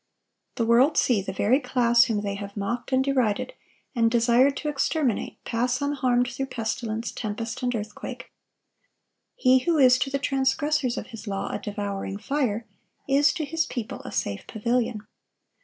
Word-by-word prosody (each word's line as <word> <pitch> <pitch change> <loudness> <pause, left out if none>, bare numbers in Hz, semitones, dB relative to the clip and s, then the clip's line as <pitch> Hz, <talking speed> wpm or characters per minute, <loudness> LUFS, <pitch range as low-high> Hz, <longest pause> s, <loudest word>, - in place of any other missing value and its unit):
The 230 - 0
world 245 +7 +4
see 230 -6 +3
the 190 - -5
very 215 +7 +2
class 240 -3 +3
whom 215 -3 -1
they 200 -1 -2
have 200 +1 -7
mocked 220 +7 -3
and 260 0 +3
derided, 260 - 0 0.4
and 230 -3 +3
desired 240 +4 +3
to 300 - -4
exterminate, 285 -3 0
pass 245 +2 0
unharmed 255 -4 +1
through 270 +2 -4
pestilence, 225 -1 -3
tempest, 225 +2 -4
and 250 -1 0
earthquake. 210 -1 -6 1.0
He 255 0 +4
who 340 -2 +2
is 255 -2 +6
to 270 - 0
the 275 - 0
transgressors 275 0 0
of - - -6
His 225 0 -9
law 195 -1 -3
a - - -3
devouring 200 -1 -4
fire, 235 -3 -1 0.4
is 285 +1 +4
to 310 - -3
His 325 +2 -1
people 240 +1 -5
a 260 - -7
safe 100 -1 -3
pavilion. 230 -1 -1
245 Hz, 160 wpm, -25 LUFS, 220-270 Hz, 1.0 s, is